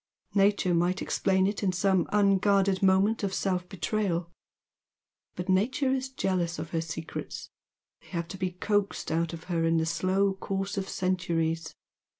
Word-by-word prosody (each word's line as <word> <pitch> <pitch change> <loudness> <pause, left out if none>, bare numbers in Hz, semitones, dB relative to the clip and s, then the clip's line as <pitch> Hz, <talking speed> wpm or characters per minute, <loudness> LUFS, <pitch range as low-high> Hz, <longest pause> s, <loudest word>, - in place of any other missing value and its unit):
Nature 200 -2 +3
might 175 +3 +2
explain 190 -1 +1
it 200 +2 -1
in 195 -3 +2
some 185 -1 +2
unguarded 195 -1 +3
moment 195 +3 +3
of 195 -2 -1
self 180 -2 -1
betrayal, 185 -3 -1 1.0
but 180 - -5
Nature 250 +8 +2
is 265 0 -2
jealous 185 -9 -1
of 155 +1 -6
her 165 - 0
secrets, 165 0 -6 0.5
they - - -21
have 170 -2 -3
to 190 - -7
be 185 -1 0
coaxed 200 +2 -1
out 165 +1 0
of 165 -1 -8
her 170 -2 -1
in 165 0 +3
the 160 - +1
slow 185 +4 +1
course 195 +1 -3
of 195 -1 -3
centuries. 165 -3 -1
185 Hz, 155 wpm, -28 LUFS, 170-200 Hz, 1.0 s, Nature